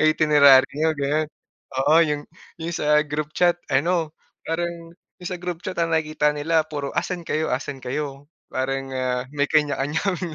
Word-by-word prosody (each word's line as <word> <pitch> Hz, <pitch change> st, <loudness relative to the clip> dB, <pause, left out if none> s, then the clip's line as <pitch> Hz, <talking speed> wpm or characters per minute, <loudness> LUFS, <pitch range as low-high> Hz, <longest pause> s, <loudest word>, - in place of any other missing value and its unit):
itinerary 150 Hz, -4 st, +6 dB
niyo," 155 Hz, +1 st, 0 dB
gano'n. 145 Hz, +2 st, 0 dB, 0.6 s
Oo, 150 Hz, -, +4 dB
yung 150 Hz, -3 st, 0 dB, 0.3 s
yung 165 Hz, +1 st, -4 dB
sa 150 Hz, -2 st, +2 dB
group 150 Hz, 0 st, -3 dB
chat 175 Hz, -1 st, +3 dB
ano, 160 Hz, +3 st, 0 dB, 0.3 s
parang 170 Hz, 0 st, -4 dB, 0.2 s
yung 180 Hz, -, -5 dB
sa 180 Hz, -, -4 dB
group 175 Hz, -1 st, -5 dB
chat 185 Hz, -2 st, -5 dB
ang 165 Hz, -1 st, +1 dB
nakikita 155 Hz, -1 st, +1 dB
nila 155 Hz, +2 st, +1 dB
puro, 145 Hz, -3 st, -4 dB
"Asan 180 Hz, -2 st, -1 dB
kayo, 160 Hz, -3 st, -1 dB
asan 135 Hz, +1 st, -3 dB
kayo," 140 Hz, +1 st, -4 dB, 0.2 s
parang, 135 Hz, +1 st, -2 dB
ah, 125 Hz, -1 st, -1 dB
may 145 Hz, 0 st, 0 dB
kanya-kanya 150 Hz, 0 st, +1 dB
kaming 180 Hz, -3 st, -2 dB
150 Hz, 160 wpm, -23 LUFS, 145-165 Hz, 0.6 s, itinerary